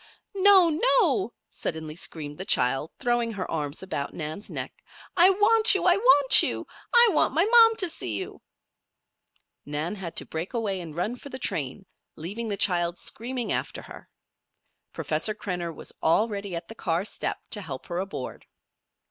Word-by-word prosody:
"No! 390 -3 +6
no!" 400 +2 +2 0.2
suddenly 160 -1 -6
screamed 150 -3 -5
the - - -4
child, 135 -2 +1
throwing 240 -1 -1
her 190 -3 -6
arms 150 +1 -4
about 145 -7 -5
Nan's 155 +5 -7
neck. - - -7 0.3
"I 360 +1 +6
want 430 +3 +4
you! 390 - -1
I 355 -1 +5
want 330 - +7
you! - - -2 0.3
I 475 -1 +6
want 310 - +1
my 335 +4 +3
mom 455 0 +6
to 370 - +2
see 120 - -4
you!" - - -7 1.2
Nan 150 +5 -4
had 190 -5 -8
to - - -1
break 165 +9 -6
away 200 -5 -2
and 165 -2 -10
run 220 +8 -2
for 280 - -12
the 260 - -7
train, 155 - -4 0.3
leaving 205 +8 -5
the 200 - -3
child 175 -3 +1
screaming 245 +1 -2
after - - -3
her. - - -13 0.8
Professor 160 +8 -1
Krenner 180 -5 -5
was 155 - -10
already 200 +2 0
at 170 - -7
the - - -9
car 175 -4 -2
step - - -3
to 210 - -1
help 140 -8 -8
her 175 0 -4
aboard. 190 -9 -7
200 Hz, 165 wpm, -25 LUFS, -, 1.2 s, want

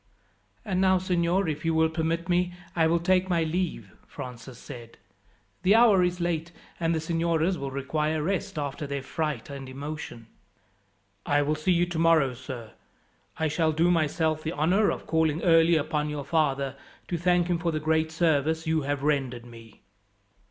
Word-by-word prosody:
"And 185 -1 0
now, 190 0 +4
signor, 180 0 +1
if 155 -1 -3
you 165 -1 +1
will 160 0 +4
permit 165 +1 -2
me 180 0 +1 0.2
I 165 -2 +3
will 170 +1 +3
take 185 +2 +2
my 170 -2 +2
leave," 160 - -3 0.2
Francis 125 0 -9
said. 120 -1 -11 0.6
"The 195 +3 +4
hour 225 -5 +6
is 180 0 -1
late, 170 -1 -2 0.3
and 165 0 +1
the - - 0
signoras 165 +2 0
will 140 -4 -4
require 150 +3 -1
rest 185 -1 -2
after 145 0 -3
their 140 -1 -4
fright 150 -3 -3
and 135 -2 -7
emotion." 140 -3 -7 1.0
"I 145 0 +2
will 150 +2 0
see 155 +4 +1
you 175 0 +3
tomorrow, 165 -5 +2
sir. 120 -3 -8 0.7
I 160 - +1
shall 160 +1 +1
do 170 +3 +3
myself 160 -1 +1
the 160 +2 -3
honour 180 +8 +2
of - - -4
calling 160 0 +1
early 165 -1 +5
upon 150 0 -1
your 145 -2 -4
father, 140 -3 0 0.3
to 175 - -2
thank 175 0 +3
him 175 -1 0
for 170 0 0
the 155 - -2
great 160 +1 +1
service 160 -1 +1
you 160 0 +1
have 140 0 -2
rendered 135 -5 -1
me." 115 -2 -14
160 Hz, 175 wpm, -27 LUFS, 145-170 Hz, 1.0 s, hour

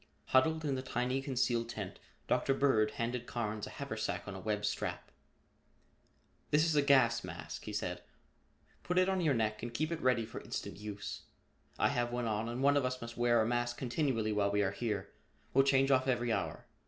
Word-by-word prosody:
Huddled 160 +4 +3
in 140 - +1
the 130 - -2
tiny 130 +1 -1
concealed 120 -3 0
tent, 105 -5 -6 0.3
Dr. 135 - +2
Bird 120 -7 +3
handed 120 +1 -2
Carnes 110 -2 -3
a - - -7
haversack 110 -8 -4
on 100 - -5
a 95 - -6
web 105 +2 -1
strap. - - -3 1.4
"This 150 +2 +4
is 160 -2 +1
a 145 - +5
gas 130 -5 +4
mask," - - -7
he - - -5
said. - - -3 0.8
"Put 180 - -2
it 185 0 +5
on 190 -1 +1
your 150 -5 +3
neck 110 -1 0
and 120 0 -4
keep 155 +6 -1
it 165 - -3
ready 125 -3 +2
for 110 - -8
instant - - -5
use. 105 0 -6 0.5
I - - +3
have 120 0 0
one 120 0 -1
on 110 +1 -1
and 120 +3 -3
one 145 +1 +5
of 140 - +2
us 130 0 -1
must 115 -1 -7
wear 120 -1 +3
a - - 0
mask 120 +1 0
continually 125 -4 0
while 105 -1 +2
we 105 0 +2
are 95 - +1
here. 100 -2 -3 0.4
We'll 135 - +6
change 135 0 +4
off 130 0 +3
every 120 -3 +1
hour. - - -3
120 Hz, 205 wpm, -33 LUFS, 110-135 Hz, 1.4 s, We'll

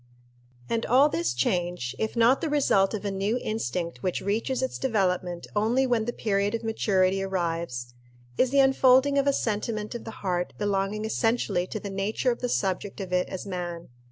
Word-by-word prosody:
And 230 - -1
all 270 +5 +5
this 170 - 0
change, 175 -2 -1
if 220 +1 -2
not 235 +4 +4
the 320 - -1
result 225 -9 +2
of 210 - -6
a 200 - -1
new 200 +4 0
instinct 170 - -3
which 180 - -1
reaches 230 +6 -1
its 260 - -3
development 180 -7 0
only 230 +6 +2
when 240 -4 +1
the 240 - -1
period 205 -2 0
of 230 - -5
maturity 195 -4 +1
arrives, 165 -10 -3 0.4
is 255 - +3
the 275 +1 +4
unfolding 270 +1 +5
of 275 - +1
a - - +6
sentiment 215 -2 -2
of 240 - -6
the - - -7 0.2
heart 180 -1 -1
belonging 205 +1 -1
essentially 225 -5 0
to 215 - -4
the 200 -1 -6
nature 205 +6 0
of 235 - -4
the 245 - -2
subject 195 -1 -1
of 185 -2 -5
it 180 0 +1
as 190 - -6
man. 175 -3 -5
205 Hz, 185 wpm, -26 LUFS, 180-235 Hz, 0.4 s, a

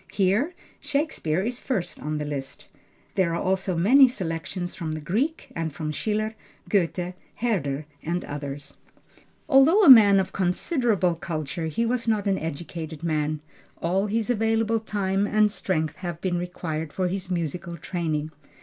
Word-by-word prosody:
Here, 210 - +1 0.2
Shakespeare 280 - -1
is 240 +3 -2
first 205 -10 -2
on 155 +1 -2
the 150 - -3
list. 140 -2 -6 0.5
There 170 -3 +1
are - - -1
also 190 -1 0
many 260 +10 +7
selections 175 -4 -4
from 160 -3 -4
the 155 - -4
Greek, 240 - -2
and 165 -1 -2
from 155 +1 -4
Schiller, 215 +6 -1 0.3
Goethe, 180 -2 0 0.2
Herder 155 - -1 0.2
and 175 +2 -2
others. 145 -1 -6 0.7
Although 310 +8 +6
a 285 - +10
man 205 -5 +9
of 190 - -2
considerable 195 - +1
culture, 160 0 -4
he 160 +9 0
was 235 0 -1
not 215 -2 +1
an 195 -1 +1
educated 160 0 -6
man, 155 -2 -1 0.4
all 190 +4 +1
his 225 +3 0
available 225 0 +1
time 200 -2 -1
and 215 0 +3
strength 160 -6 -1
having 175 -3 -5
been 175 - 0
required 160 -3 -4
for 185 +3 -1
his 185 0 -3
musical 170 0 -3
training. 155 -2 -2
180 Hz, 150 wpm, -25 LUFS, 160-215 Hz, 0.7 s, a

